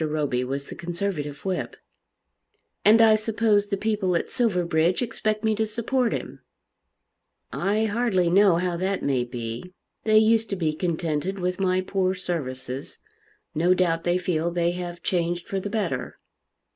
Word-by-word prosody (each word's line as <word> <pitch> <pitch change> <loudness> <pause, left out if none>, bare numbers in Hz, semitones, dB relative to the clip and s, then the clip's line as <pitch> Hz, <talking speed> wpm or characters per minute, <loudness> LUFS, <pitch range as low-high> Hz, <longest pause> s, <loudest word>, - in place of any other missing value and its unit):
Roby 150 -5 0
was 140 +2 -4
the - - -7
Conservative 170 -4 -4
whip. 185 -2 -2 1.1
"And 225 +2 +7
I 220 -1 +7
suppose 215 -1 +2
the 200 - -1
people 205 -4 0
at 170 - -1
Silverbridge 180 -4 +1
expect 215 -2 -2
me 220 0 +2
to 220 +1 0
support 235 +2 0
him." - - -5 1.1
"I 210 +3 +1
hardly 210 -5 +1
know 190 +1 +5
how 175 0 0
that 190 +2 -1
may 130 -3 +1
be. 120 +8 -6 0.3
They 215 -1 +4
used 225 0 +4
to 195 - -1
be 160 -4 0
contented 165 +1 -2
with 180 0 -2
my 185 -1 +2
poor 185 0 0
services. 135 -7 -4 0.6
No 175 +4 +3
doubt 165 -3 +1
they 175 +1 +2
feel 170 -2 0
they 170 0 +1
have 175 -1 -6
changed 175 -1 -1
for 195 - -2
the 205 - -4
better." 185 - -2
180 Hz, 155 wpm, -25 LUFS, 165-210 Hz, 1.1 s, And